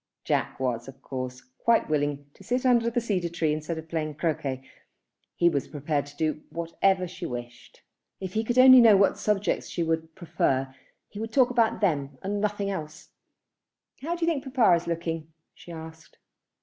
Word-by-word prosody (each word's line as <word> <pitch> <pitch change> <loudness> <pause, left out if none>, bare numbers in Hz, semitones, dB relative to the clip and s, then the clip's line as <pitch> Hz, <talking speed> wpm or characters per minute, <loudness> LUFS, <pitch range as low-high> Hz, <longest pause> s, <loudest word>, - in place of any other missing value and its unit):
Jack - - -1
was 125 -2 -2
of 135 0 -11
course 130 -1 -5 0.2
quite 230 -1 +3
willing 145 -1 -1
to - - -17
sit 250 +3 -1
under 235 -2 +4
the 235 - 0
cedar 195 -7 -1
tree 165 -2 0
instead 155 +2 -4
of 160 0 -8
playing 155 -2 -3
croquet. 140 -5 -2 0.7
He 175 - +3
was 145 -5 0
prepared 145 -1 -2
to 145 0 -15
do 155 0 -1
whatever 180 +3 0
she 175 0 -6
wished. 120 -1 -9 0.4
If 190 -1 -6
he 220 - 0
could 240 +2 -2
only 255 0 +9
know 220 -4 +7
what 195 - +3
subjects 210 -1 0
she 170 - -2
would 160 0 -2
prefer, 135 -6 -1 0.3
he 205 - -10
would 225 +1 -4
talk 255 0 +4
about 230 -3 +2
them 140 -8 0
and 200 +1 -2
nothing 205 -1 -1
else. 150 -5 -7 0.9
"How 330 +5 -2
do 340 -1 -1
you 335 - +2
think 285 -5 -2
papa 255 -8 +3
is 170 0 -4
looking?" 165 -1 -3 0.2
she 175 - -13
asked. 160 -1 -11
170 Hz, 185 wpm, -27 LUFS, 150-210 Hz, 0.9 s, only